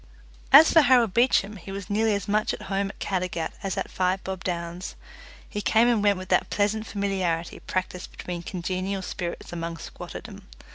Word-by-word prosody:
As 300 +4 +9
for 325 - +8
Harold 245 -8 +4
Beecham, 225 -4 +3
he 195 +2 -9
was 195 0 -6
nearly 215 +1 +2
as 200 - -4
much 215 +1 +1
at - - -11
home 195 0 -1
at - - -11
Caddagat 180 -4 -2
as 195 -2 -3
at - - -3
Five 185 +1 0
Bob 190 -1 -5
Downs. 175 +1 -4 0.5
He 205 - -4
came 225 +3 +4
and 235 -3 +3
went 205 -1 +3
with 185 0 -8
that - - +2
pleasant 215 +2 0
familiarity 190 -5 -1
practised 185 -1 -3
between 175 -1 -6
congenial 185 +2 -3
spirits 175 -1 -5
among 170 -1 -4
squatterdom. - - -9
195 Hz, 180 wpm, -26 LUFS, 180-210 Hz, 0.5 s, As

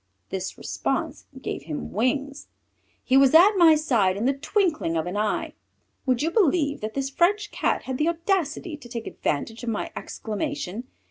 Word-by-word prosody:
This 190 -1 -4
response - - -3
gave 140 - -5
him 155 -2 -5
wings; 275 +6 -1 0.6
he 265 - +3
was 275 +2 +5
at 365 +6 +8
my 335 -4 +7
side 230 -11 +2
in 215 - -1
the 270 - +3
twinkling 305 - 0
of 160 - -1
an 180 +2 -4
eye. 210 0 -1 0.5
Would 255 +1 +2
you 325 - 0
believe 315 -7 +2
that 215 +1 -5
this 270 0 -2
French 415 +8 +2
Cat - - 0
had 260 -1 -4
the 305 - +2
audacity 340 -1 -1
to 255 -5 -13
take 235 -2 -5
advantage 225 +11 -3
of 240 - -2
my 215 - -3
exclamation. 235 - -4
275 Hz, 175 wpm, -25 LUFS, 220-320 Hz, 0.6 s, at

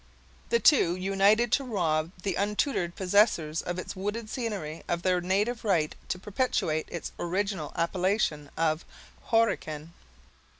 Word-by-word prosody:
The 470 - +3
two 180 - +5
united 195 +5 +3
to 275 - +3
rob 165 -10 0
the 195 - 0
untutored 200 -2 0
possessors 180 -5 +2
of 175 0 -4
its 185 - -5
wooded 210 +3 -4
scenery 200 - -4
of 170 0 -1
their 180 -1 +2
native 205 +6 0
right 170 -8 +1
to - - -2
perpetuate 190 -6 -1
its 170 - -5
original 185 -3 -2
appellation 170 -3 0
of 160 0 +1 0.4
"Horican." 165 -9 +1
190 Hz, 130 wpm, -28 LUFS, 165-210 Hz, 0.4 s, two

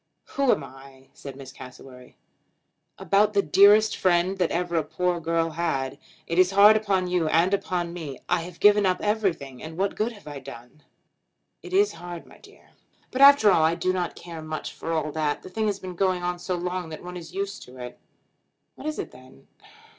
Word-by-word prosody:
"Who 275 -2 +2
am - - 0
I?" 135 0 -14
said 140 -2 -10
Miss 135 -1 -10
Cassewary. 125 0 -13 0.8
"About 205 +1 +2
the 200 -1 +2
dearest 210 +2 +5
friend 185 +1 +1
that 180 - +2
ever 175 0 -2
a 160 - +1
poor 180 +3 -1
girl 165 0 -1
had. 155 -5 -2 0.3
It 170 +2 -1
is 185 -1 +5
hard 200 +2 +7
upon 200 -4 0
you, 180 -3 0
and 170 +5 +2
upon 175 -3 -2
me. 155 -7 -7
I 175 -1 +1
have 170 0 -10
given 205 -1 +5
up 185 -1 0
everything, 190 - -2
and 160 +1 -9
what 195 +1 -1
good 220 +3 -1
have 205 - -16
I 145 -2 -7
done?" 130 +1 -12 0.8
"It - - -11
is 405 +2 +3
hard, 175 -1 -9
my - - -18
dear." - - -20 0.4
"But 260 - -2
after 280 -7 +8
all 165 - +4
I 160 +1 +3
do 185 +2 -1
not 180 -2 -3
care 170 -2 -9
much 155 0 -6
for 165 - -6
all 155 -2 -1
that. 150 -1 -2
The - - -10
thing 215 +3 -2
has 205 -2 -1
been 185 -2 -8
going 185 0 0
on 175 0 -2
so 180 +1 -3
long 180 -1 -4
that 155 - -9
one 180 0 -8
is 175 0 -10
used 200 +1 -4
to 125 +1 -15
it." 125 -1 -9 0.7
"What - - -9
is 310 - -3
it - - -5
then?" 130 - -17
175 Hz, 205 wpm, -25 LUFS, 155-195 Hz, 0.8 s, after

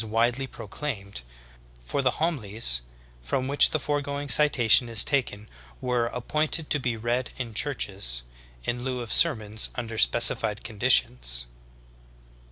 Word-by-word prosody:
163 110 0 -6 0.2
widely 135 - -4
proclaimed, 100 - -7 0.6
for 65 - -3
the 130 - +2
homilies 110 - -1 0.4
from 130 - -3
which 140 +1 +5
the - - -1
forego 145 -1 -3
ing 145 0 -6
citation 125 -5 +4
is 115 -2 +6
taken 115 -7 0 0.3
were 125 -2 -1
"appointed 150 +6 -1
to 145 - +4
be 120 -3 -3
read 120 +3 -2
in 120 -3 -5
churches" 100 - -1 0.4
in 120 +1 -3
lieu 130 -1 -4
of 115 - -3
sermons 110 0 +3
under 115 -2 -5
specified 105 - +3
conditions. 60 - +1
120 Hz, 135 wpm, -25 LUFS, 105-140 Hz, 0.6 s, is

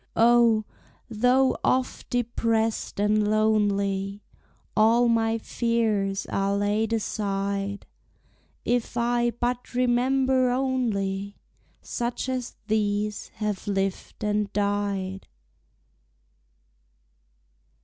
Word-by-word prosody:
O, 230 -2 +5 0.5
though 250 +4 +3
oft 255 0 0
depressed 225 -3 -1
and 210 +1 +2
lonely, 200 -2 +1 0.5
All 230 +3 +4
my 225 -1 +2
fears 220 -4 0
are 195 0 0
laid 205 +2 0
aside 200 -2 -2 0.8
If 240 -1 -1
I 240 0 +2
but 245 +2 -3
remember 255 +1 +2
only 215 -7 -1 0.5
Such 240 +2 -3
as 255 -2 -3
these 210 -1 -1
have 210 -3 -3
lived 195 +2 -2
and 210 -1 0
died! 200 -2 -1
220 Hz, 80 wpm, -26 LUFS, 200-240 Hz, 0.8 s, O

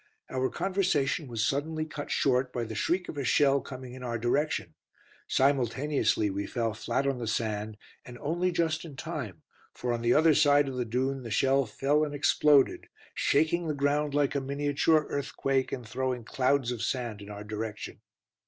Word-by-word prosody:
Our 130 0 0
conversation 180 -7 0
was 115 -3 -1
suddenly 155 +3 -1
cut 150 -2 -7
short 130 -1 +1
by 120 - -2
the 110 -1 -6
shriek 175 - 0
of 145 - -5
a - - -1
shell 140 +2 +3
coming 130 -2 -9
in 130 - -9
our 120 -2 -2
direction. 120 - -1 0.5
Simultaneously 135 -4 +1
we 100 +1 -3
fell 115 -2 -1
flat 115 +5 -1
on 135 -2 0
the 115 - -4
sand, 110 -1 -2 0.3
and 125 0 -10
only 175 +7 -1
just 165 -2 0
in 155 -5 -9
time, - - -6 0.3
for 120 -1 -2
on 120 - -2
the 120 +1 +3
other 160 +1 +5
side 145 0 +4
of 135 - -4
the 125 -1 -1
dune 130 +4 -1
the 120 - -7
shell 135 +4 +2
fell 145 +7 +1
and 145 -1 -3
exploded, 145 -1 +3 0.2
shaking 160 +3 +1
the 150 - -1
ground 145 +1 0
like 145 -1 +2
a 140 - 0
miniature 145 +3 +1
earthquake 135 -1 -1
and 125 -4 -5
throwing 130 0 -2
clouds 130 +1 +1
of 120 -3 -4
sand 120 -5 -2
in 100 - -10
our 105 0 -7
direction. 105 0 -6
135 Hz, 180 wpm, -29 LUFS, 120-145 Hz, 0.5 s, other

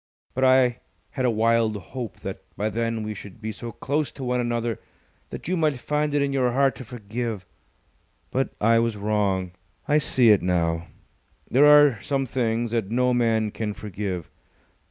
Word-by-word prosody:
But 130 - -1
I 130 -2 +4 0.3
had 130 - -2
a - - +4
wild 115 -1 +2
hope 115 +4 -7
that - - -5 0.2
by 105 +1 0
then 115 0 -2
we 105 0 -4
should 100 0 -11
be 110 0 -4
so 115 +3 -7
close 145 +6 -2
to 135 - -8
one 125 0 0
another 120 -1 -1 0.5
that - - -8
you 185 - +1
might 155 -4 +1
find 150 +3 -1
it 145 - +3
in 140 -1 -1
your 125 -3 +1
heart 135 +1 +3
to - - -7
forgive. 115 -3 -5 0.9
But 135 +1 0
I 115 +2 +4
was 115 -2 0
wrong. 100 -3 0 0.4
I 150 +1 +4
see 125 -5 +4
it 105 - +4
now. 85 -2 0 0.6
There 140 +4 +6
are 145 -6 +6
some 135 -1 -1
things 115 -2 -1
that 115 -4 -1
no 125 +2 +2
man 115 -3 +1
can 105 -1 -4
forgive. 95 -4 -5
115 Hz, 175 wpm, -24 LUFS, 105-130 Hz, 0.9 s, There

